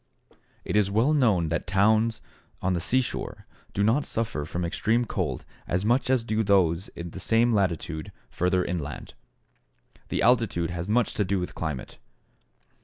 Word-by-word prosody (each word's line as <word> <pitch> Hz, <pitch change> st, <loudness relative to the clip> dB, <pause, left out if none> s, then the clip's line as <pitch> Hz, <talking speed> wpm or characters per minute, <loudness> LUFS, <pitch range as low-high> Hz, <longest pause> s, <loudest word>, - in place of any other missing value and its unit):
It -, -, -2 dB
is 105 Hz, -2 st, +3 dB
well 115 Hz, +9 st, +2 dB
known 105 Hz, -, +3 dB
that 80 Hz, 0 st, -2 dB
towns 110 Hz, +4 st, +2 dB, 0.4 s
on 90 Hz, 0 st, 0 dB
the 85 Hz, -, 0 dB
seashore 130 Hz, +9 st, -2 dB, 0.3 s
do 100 Hz, -, 0 dB
not 115 Hz, +8 st, +3 dB
suffer 110 Hz, -10 st, -3 dB
from 85 Hz, +3 st, -3 dB
extreme 115 Hz, +7 st, +1 dB
cold -, -, -3 dB, 0.2 s
as 90 Hz, +3 st, -1 dB
much 125 Hz, +3 st, +2 dB
as 130 Hz, -3 st, +3 dB
do 110 Hz, -1 st, 0 dB
those 95 Hz, -3 st, +3 dB
in 85 Hz, 0 st, -6 dB
the 95 Hz, -, -7 dB
same 115 Hz, +5 st, +3 dB
latitude 85 Hz, -5 st, -1 dB, 0.2 s
further 90 Hz, +7 st, +1 dB
inland. 75 Hz, -5 st, -5 dB, 1.0 s
The -, -, 0 dB
altitude 115 Hz, -9 st, +2 dB
has 85 Hz, 0 st, -4 dB
much 115 Hz, +1 st, +2 dB
to 105 Hz, -, +1 dB
do 100 Hz, 0 st, 0 dB
with 90 Hz, -, -4 dB
climate. 75 Hz, -5 st, -5 dB
100 Hz, 160 wpm, -26 LUFS, 85-115 Hz, 1.0 s, is